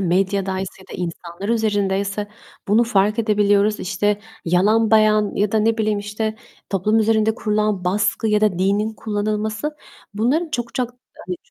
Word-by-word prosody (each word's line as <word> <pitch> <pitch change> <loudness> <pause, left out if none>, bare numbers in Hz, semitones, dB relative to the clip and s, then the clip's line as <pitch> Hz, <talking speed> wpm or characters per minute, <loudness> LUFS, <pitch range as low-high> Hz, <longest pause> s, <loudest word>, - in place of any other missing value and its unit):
medyadaysa 190 +1 0
ya 190 - -10
da - - -2
insanlar 175 +2 -6
üzerindeyse 205 -2 0 0.4
bunu 225 +4 +4
fark 210 -1 +1
edebiliyoruz. 210 -1 +2
İşte, 205 +2 0 0.2
yalan 210 +6 +3
beyan 215 -1 +4
ya 205 0 0
da 220 - +3
ne 225 +1 +1
bileyim, 215 -1 +1
işte, 215 +1 -3 0.3
toplum 210 +3 +2
üzerinde 220 0 +2
kurulan 210 -4 0
baskı 210 +3 0
ya 210 0 +3
da 210 -5 +2
dinin 205 +4 +1
kullanılması... 215 +6 -2 0.4
Bunların 275 +11 +1
çok 240 -5 -4
çok, 250 -2 -1 0.4
hani, 180 0 -3
ç - - -33
210 Hz, 150 wpm, -21 LUFS, 195-220 Hz, 0.4 s, bunu